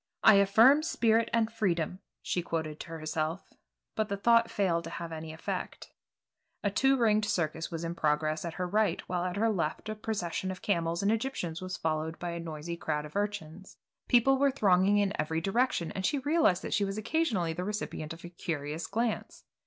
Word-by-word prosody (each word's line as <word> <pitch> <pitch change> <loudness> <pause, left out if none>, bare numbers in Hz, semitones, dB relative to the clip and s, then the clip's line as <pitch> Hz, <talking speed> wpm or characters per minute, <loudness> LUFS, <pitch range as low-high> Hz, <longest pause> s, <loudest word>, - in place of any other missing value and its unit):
I - - +9
affirm 225 +9 +6
spirit 230 -7 +2
and 230 -1 +1
freedom," 180 -5 -1 0.2
she 180 - -1
quoted 160 -3 -3
to - - -7
herself, 160 +1 -3 0.4
but 215 -2 -1
the 200 - -2
thought 230 +3 +4
failed 175 -5 0
to - - -5
have 170 0 -6
any 160 0 -6
effect. 160 +1 -5 0.7
A 205 - +1
two 270 +6 +3
ringed 215 -3 +3
circus 160 -4 -1
was 165 -1 -5
in 165 0 -2
progress 155 -1 0
at 170 -2 -5
her 180 - -2
right 205 -2 +1
while 175 -1 -1
at 180 0 -2
her 225 +2 +2
left 170 +1 -2
a - - -1
procession 200 -4 -3
of 185 -1 -6
camels 170 -2 0
and 200 - +3
Egyptians 220 -8 -2
was 185 0 -4
followed 160 0 -2
by 175 -1 -4
a 170 - -4
noisy 165 0 -5
crowd 150 -3 -2
of 150 - -12
urchins. 195 -3 -4 0.3
People 260 +2 +4
were 280 0 +4
thronging 200 -6 +3
in 200 -1 +2
every 160 +1 -1
direction, 195 -1 0
and 190 - -4
she 290 - +1
realized 285 - +2
that - - -3
she 205 - +2
was 195 +1 -2
occasionally 215 - 0
the 180 +2 -4
recipient 205 -6 -4
of 165 +1 -9
a - - -7
curious 160 -2 -4
glance. 225 +1 -2
185 Hz, 195 wpm, -30 LUFS, 165-215 Hz, 0.7 s, I